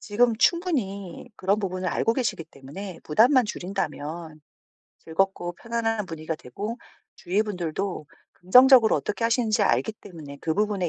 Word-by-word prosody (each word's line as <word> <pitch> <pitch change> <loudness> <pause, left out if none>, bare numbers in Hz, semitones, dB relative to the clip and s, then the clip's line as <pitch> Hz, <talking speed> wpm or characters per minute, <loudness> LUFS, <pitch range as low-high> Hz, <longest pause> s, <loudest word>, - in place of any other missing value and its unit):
지금 230 +2 +2
충분히 240 - 0
그런 195 +3 +1
부분을 185 -3 -3
알고 225 +6 +1
계시기 235 -10 -2
때문에 165 +6 -9
부담만 245 - +4
줄인다면 170 -5 -5 0.6
즐겁고 175 +1 -1
편안한 225 -1 -2
분위기가 160 0 -5
되고 205 - -6 0.4
주위 195 +5 0
분들도 180 -4 -4 0.3
긍정적으로 250 +5 +6
어떻게 210 +2 -3
하시는지 230 -2 +2
알기 220 +2 +1
때문에 160 -9 -11
그 160 - -1
부분에 205 -3 0
195 Hz, 345 characters per minute, -25 LUFS, 170-225 Hz, 0.6 s, 긍정적으로